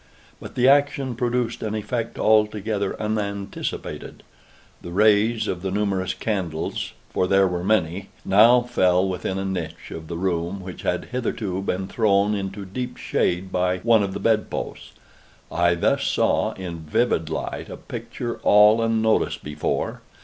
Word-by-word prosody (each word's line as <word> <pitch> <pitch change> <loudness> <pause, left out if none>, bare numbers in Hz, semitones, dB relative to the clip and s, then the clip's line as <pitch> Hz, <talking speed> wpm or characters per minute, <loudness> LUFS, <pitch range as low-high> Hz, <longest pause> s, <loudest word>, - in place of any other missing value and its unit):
But - - -10
the 125 +1 +3
action 140 -2 +3
produced 120 -1 -1
an 110 -1 -2
effect 115 +2 -3
altogether 105 -2 +1
unanticipated. 100 -2 -4 0.6
The - - -8
rays 110 +3 +3
of 90 - -3
the 95 - -2
numerous 95 -2 -1
candles 95 -6 -3 0.2
(for 90 - +1
there 95 0 +4
were 90 -1 -3
many) 95 -2 0 0.2
now 115 +5 +6
fell 95 -6 +2
within 95 0 -3
a 95 - -2
niche 95 -1 -5
of 80 -1 -7
the 85 - -5
room 90 +1 -1
which 90 -1 -8
had 90 - -1
hitherto 110 -6 -2
been 95 -1 -2
thrown 105 -2 +2
into 100 0 -4
deep 125 +7 -5
shade 90 +2 -1
by 90 0 +1
one 115 0 +4
of 100 -1 -2
the - - -3
bed 110 -1 +1
posts. - - -6 0.6
I 85 0 +3
thus 85 - +1
saw - - +1
in 90 -3 -6
vivid 80 +1 0
light 80 - -4
a - - -7
picture 120 -1 -6
all 105 +2 +6
unnoticed 110 -1 +1
before. 75 0 -2
100 Hz, 150 wpm, -23 LUFS, 90-110 Hz, 0.6 s, now